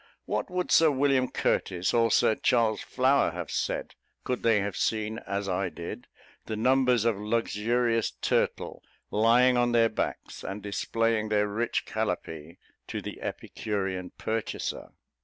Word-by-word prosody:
What -, -, -2 dB
would 180 Hz, 0 st, -2 dB
Sir 160 Hz, -1 st, +6 dB
William 135 Hz, -2 st, +2 dB
Curtis, 90 Hz, -1 st, 0 dB
or 115 Hz, -1 st, +3 dB
Sir 110 Hz, -, +4 dB
Charles 115 Hz, -1 st, +2 dB
Flower 135 Hz, +2 st, +2 dB
have 90 Hz, -2 st, -5 dB
said, -, -, -2 dB, 0.3 s
could 125 Hz, -1 st, -2 dB
they 115 Hz, -2 st, +3 dB
have 100 Hz, 0 st, -3 dB
seen, 110 Hz, 0 st, -1 dB
as 100 Hz, 0 st, -2 dB
I 95 Hz, 0 st, -1 dB
did, 105 Hz, +9 st, -8 dB, 0.4 s
the 110 Hz, -, -3 dB
numbers 125 Hz, 0 st, +3 dB
of 115 Hz, -4 st, +2 dB
luxurious 115 Hz, +1 st, 0 dB
turtle -, -, -1 dB, 0.3 s
lying 120 Hz, +4 st, +4 dB
on 120 Hz, 0 st, +2 dB
their 115 Hz, -1 st, +4 dB
backs, 110 Hz, -, -4 dB
and 100 Hz, +2 st, -6 dB
displaying 110 Hz, +2 st, 0 dB
their 105 Hz, -1 st, +2 dB
rich 115 Hz, +3 st, -1 dB
calapee 85 Hz, -7 st, -4 dB, 0.3 s
to -, -, -4 dB
the -, -, -8 dB
epicurean 95 Hz, -4 st, -3 dB
purchaser? 110 Hz, 0 st, -3 dB
110 Hz, 140 wpm, -28 LUFS, 105-120 Hz, 0.4 s, Sir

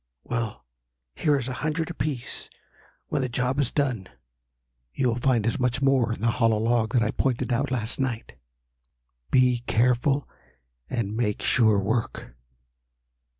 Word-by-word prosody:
"Well, 115 Hz, -, -3 dB, 0.5 s
here 150 Hz, -, +2 dB
is 125 Hz, -3 st, -3 dB
a 130 Hz, -, -3 dB
hundred 155 Hz, +2 st, -1 dB
apiece. 140 Hz, -5 st, -4 dB, 0.6 s
When -, -, 0 dB
the 130 Hz, -, -1 dB
job 125 Hz, +3 st, 0 dB
is 135 Hz, -4 st, +2 dB
done, 125 Hz, -10 st, -1 dB, 0.9 s
you 130 Hz, -, +1 dB
will 120 Hz, +1 st, -1 dB
find 120 Hz, -4 st, +2 dB
as 115 Hz, -, 0 dB
much 125 Hz, +1 st, +1 dB
more 135 Hz, -4 st, +3 dB
in 115 Hz, -, -4 dB
the 115 Hz, +1 st, +3 dB
hollow 115 Hz, -1 st, +4 dB
log 115 Hz, +1 st, +1 dB
that 120 Hz, -3 st, +4 dB
I 110 Hz, -, 0 dB
pointed 125 Hz, -1 st, 0 dB
out 135 Hz, +4 st, 0 dB
last 125 Hz, -1 st, -2 dB
night. 120 Hz, -, -2 dB, 1.0 s
Be 125 Hz, -1 st, +4 dB
careful 125 Hz, +4 st, +2 dB, 0.6 s
and 110 Hz, -4 st, -2 dB
make 110 Hz, -3 st, -1 dB
sure 110 Hz, -4 st, +4 dB
work!" 100 Hz, -, -2 dB
120 Hz, 150 wpm, -26 LUFS, 115-130 Hz, 1.0 s, hollow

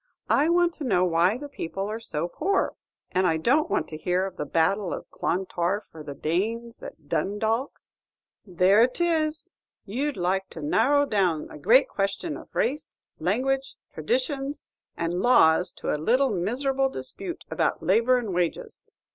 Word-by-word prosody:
"I 300 Hz, +4 st, +4 dB
want 345 Hz, 0 st, +3 dB
to 310 Hz, -, -6 dB
know 185 Hz, -8 st, +2 dB
why 175 Hz, +5 st, +2 dB
the 290 Hz, +3 st, -7 dB
people 195 Hz, -7 st, -5 dB
are 215 Hz, +2 st, -4 dB
so 170 Hz, -8 st, -3 dB
poor, 380 Hz, -, 0 dB, 0.4 s
and 185 Hz, 0 st, +2 dB
I 160 Hz, -, +2 dB
don't 265 Hz, -, +2 dB
want -, -, 0 dB
to 155 Hz, -, -6 dB
hear 180 Hz, +3 st, 0 dB
of 190 Hz, -2 st, -6 dB
the 150 Hz, -, -4 dB
battle 180 Hz, +5 st, +1 dB
of -, -, -9 dB
Clontarf, 185 Hz, +2 st, -2 dB
or 160 Hz, -, -9 dB
the 145 Hz, -2 st, -7 dB
Danes 225 Hz, -, -2 dB
at 155 Hz, -3 st, -11 dB
Dundalk." 220 Hz, -, -1 dB, 0.6 s
"There 185 Hz, +3 st, +4 dB
it 250 Hz, +6 st, +2 dB
is, 325 Hz, 0 st, 0 dB, 0.3 s
you'd 270 Hz, +8 st, -2 dB
like 190 Hz, +2 st, -1 dB
to 160 Hz, -, -9 dB
narrow 285 Hz, -, +3 dB
down 185 Hz, -, 0 dB
a -, -, -10 dB
great 235 Hz, -, +5 dB
question 200 Hz, -, -2 dB
of -, -, -12 dB
race, 280 Hz, +5 st, -1 dB, 0.2 s
language, 270 Hz, +1 st, 0 dB, 0.2 s
traditions, 290 Hz, -, -2 dB, 0.3 s
and 170 Hz, +2 st, -1 dB
laws 180 Hz, -7 st, +4 dB
to -, -, -4 dB
a 150 Hz, -, -2 dB
little 255 Hz, -, +3 dB
miserable 265 Hz, +8 st, 0 dB
dispute 340 Hz, -, -6 dB
about -, -, 0 dB
labor 250 Hz, +2 st, +3 dB
and 225 Hz, -6 st, -3 dB
wages. 175 Hz, -1 st, -2 dB
210 Hz, 165 wpm, -26 LUFS, 175-270 Hz, 0.6 s, great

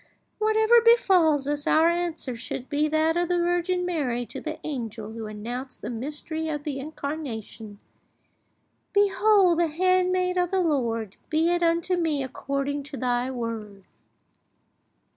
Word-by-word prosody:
Whatever 440 Hz, +2 st, +4 dB
befalls 360 Hz, -, +4 dB
us, 290 Hz, 0 st, -2 dB
our 320 Hz, +1 st, +5 dB
answer 340 Hz, -7 st, -1 dB
should 245 Hz, +2 st, -6 dB
be 300 Hz, +1 st, +1 dB
that 315 Hz, +1 st, +2 dB
of 350 Hz, 0 st, +1 dB
the 355 Hz, -, +2 dB
Virgin 350 Hz, +1 st, 0 dB
Mary 265 Hz, -9 st, -1 dB
to -, -, -8 dB
the 310 Hz, 0 st, -5 dB
angel 230 Hz, -7 st, -5 dB
who 225 Hz, -1 st, -6 dB
announced 240 Hz, +5 st, -7 dB
the -, -, -4 dB
mystery 300 Hz, +6 st, -4 dB
of 295 Hz, -2 st, -3 dB
the 285 Hz, -3 st, -4 dB
Incarnation: 270 Hz, -8 st, -6 dB, 1.2 s
'Behold 405 Hz, -3 st, +4 dB
the 340 Hz, -, +3 dB
handmaid 365 Hz, +2 st, +1 dB
of 355 Hz, -1 st, +1 dB
the 385 Hz, -, +1 dB
Lord; 235 Hz, -, -1 dB
be 320 Hz, +2 st, +2 dB
it 350 Hz, 0 st, +1 dB
unto 340 Hz, +2 st, +1 dB
me 305 Hz, -5 st, 0 dB
according 275 Hz, +2 st, -3 dB
to 280 Hz, 0 st, -9 dB
Thy 250 Hz, 0 st, 0 dB
word. 225 Hz, -5 st, -5 dB
305 Hz, 140 wpm, -25 LUFS, 250-350 Hz, 1.2 s, our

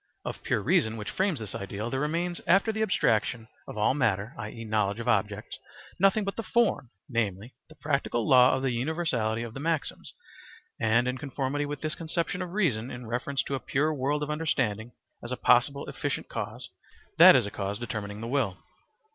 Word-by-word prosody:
Of -, -, -5 dB
pure -, -, 0 dB
reason 110 Hz, 0 st, +2 dB
which 105 Hz, 0 st, -5 dB
frames 190 Hz, -, 0 dB
this 110 Hz, -4 st, -6 dB
ideal, 100 Hz, +4 st, -4 dB
there 130 Hz, -, -1 dB
remains 170 Hz, +4 st, -1 dB
after 195 Hz, +5 st, +4 dB
the 220 Hz, 0 st, -3 dB
abstraction 115 Hz, -, +1 dB, 0.2 s
of -, -, -8 dB
all 105 Hz, +4 st, +3 dB
matter, 110 Hz, -6 st, 0 dB
i.e., 110 Hz, +2 st, -6 dB
knowledge 105 Hz, -1 st, 0 dB
of 115 Hz, -, -5 dB
objects, 105 Hz, -2 st, 0 dB, 0.4 s
nothing 195 Hz, +3 st, +4 dB
but 200 Hz, 0 st, -3 dB
the -, -, -3 dB
form, 230 Hz, -, +1 dB, 0.2 s
namely, 110 Hz, -1 st, -2 dB, 0.2 s
the 155 Hz, -, -15 dB
practical 140 Hz, -5 st, -1 dB
law 125 Hz, -1 st, +6 dB
of 130 Hz, -, -3 dB
the 135 Hz, -, +1 dB
universality 120 Hz, -4 st, -1 dB
of 115 Hz, -2 st, -7 dB
the 135 Hz, -, -7 dB
maxims, 160 Hz, 0 st, -2 dB, 0.7 s
and 115 Hz, +2 st, +3 dB
in 125 Hz, 0 st, -2 dB
conformity 145 Hz, +1 st, -2 dB
with 145 Hz, -1 st, -5 dB
this 155 Hz, -1 st, -2 dB
conception 165 Hz, +3 st, -2 dB
of 180 Hz, -1 st, -5 dB
reason 130 Hz, -, +1 dB
in 120 Hz, -1 st, -7 dB
reference 125 Hz, +4 st, -1 dB
to -, -, -5 dB
a 135 Hz, -, 0 dB
pure 150 Hz, +4 st, 0 dB
world 145 Hz, +2 st, 0 dB
of 150 Hz, -, -3 dB
understanding 125 Hz, -8 st, -1 dB, 0.3 s
as 120 Hz, -, -6 dB
a 125 Hz, -, -2 dB
possible 140 Hz, +3 st, +3 dB
efficient -, -, -3 dB
cause, -, -, -6 dB, 0.5 s
that -, -, +10 dB
is -, -, +4 dB
a 100 Hz, -, -5 dB
cause 100 Hz, 0 st, -3 dB
determining 105 Hz, -2 st, -5 dB
the 115 Hz, -, -4 dB
will. 120 Hz, -8 st, 0 dB
125 Hz, 190 wpm, -28 LUFS, 110-150 Hz, 0.7 s, that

